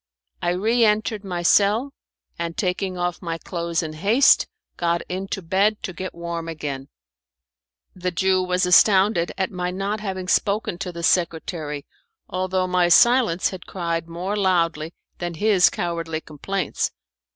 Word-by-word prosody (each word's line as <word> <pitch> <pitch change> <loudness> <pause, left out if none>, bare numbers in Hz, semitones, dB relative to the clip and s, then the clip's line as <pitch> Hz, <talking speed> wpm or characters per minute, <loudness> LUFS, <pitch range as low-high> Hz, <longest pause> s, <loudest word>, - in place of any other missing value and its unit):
I - - 0
re 225 +6 +2
entered 215 -1 +1
my 180 -3 -4
cell, 215 +9 +3 0.5
and 170 -1 -4
taking 185 -1 -1
off 175 0 -2
my 165 -2 -3
clothes 170 0 -3
in 155 -1 -5
haste, 210 - +4 0.3
got 170 0 0
into 190 +1 -4
bed 200 +5 +1
to 185 - -4
get 185 +1 -6
warm 170 -1 -5
again. 145 -4 -5 1.1
The 180 0 -2
Jew 185 +1 +1
was 180 0 +1
astonished 190 0 +4
at 190 - -1
my 180 -1 -3
not 195 +3 -2
having 190 -3 -4
spoken 200 -2 0
to 185 -2 -4
the 170 -1 -7
secretary, 160 -4 -1 0.4
although 185 0 -1
my 180 -1 +2
silence 235 -2 +5
had 185 -2 -9
cried 170 -2 -3
more 180 +4 -4
loudly 170 -5 +1 0.3
than 175 -1 -4
his 205 0 +4
cowardly 165 -2 -3
complaints. 185 +6 -3
180 Hz, 145 wpm, -23 LUFS, 170-195 Hz, 1.1 s, silence